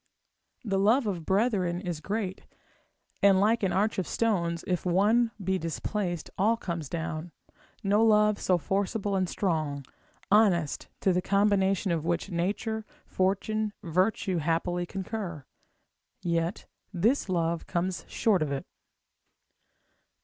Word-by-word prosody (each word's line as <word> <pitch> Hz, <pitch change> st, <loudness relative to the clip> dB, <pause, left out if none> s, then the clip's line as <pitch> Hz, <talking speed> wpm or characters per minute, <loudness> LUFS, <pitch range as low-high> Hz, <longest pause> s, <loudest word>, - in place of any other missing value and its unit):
The 195 Hz, -3 st, 0 dB
love 225 Hz, +6 st, +4 dB
of 180 Hz, -6 st, -3 dB
brethren 190 Hz, -4 st, +1 dB
is 175 Hz, -4 st, -4 dB
great, 195 Hz, +1 st, -3 dB, 0.7 s
and 195 Hz, -1 st, +6 dB
like 220 Hz, +4 st, +3 dB
an 195 Hz, -, +1 dB
arch 210 Hz, +2 st, +1 dB
of 185 Hz, -, -2 dB
stones, 170 Hz, -7 st, 0 dB
where 185 Hz, -, 0 dB
if 180 Hz, -, -1 dB
one 210 Hz, +7 st, +3 dB
be 190 Hz, 0 st, 0 dB
displaced, 175 Hz, +1 st, -3 dB
all 220 Hz, +4 st, +3 dB
comes 170 Hz, -, -4 dB
down, 165 Hz, 0 st, -4 dB, 0.5 s
no 205 Hz, +2 st, +3 dB
love 210 Hz, -1 st, +4 dB
so 180 Hz, -, +3 dB
forcible 200 Hz, +4 st, -1 dB
and 185 Hz, -2 st, 0 dB
strong, 155 Hz, -7 st, -1 dB, 0.5 s
honest, 190 Hz, -8 st, +3 dB
to 190 Hz, -, +3 dB
the 180 Hz, -, +1 dB
combination 195 Hz, -1 st, +2 dB
of 165 Hz, -2 st, 0 dB
which, 170 Hz, +3 st, -1 dB
nature, 210 Hz, +6 st, -1 dB, 0.2 s
fortune, 205 Hz, +3 st, 0 dB
virtue, 185 Hz, +2 st, +1 dB
happily 170 Hz, +2 st, 0 dB
concur; 190 Hz, -, -5 dB, 0.8 s
yet 170 Hz, +1 st, -1 dB, 0.3 s
this 205 Hz, +6 st, +1 dB
love 170 Hz, -2 st, 0 dB
comes 180 Hz, +1 st, -2 dB
short 205 Hz, -6 st, +2 dB
of 150 Hz, -2 st, -1 dB
it. 135 Hz, -1 st, -3 dB
190 Hz, 130 wpm, -28 LUFS, 170-210 Hz, 0.8 s, and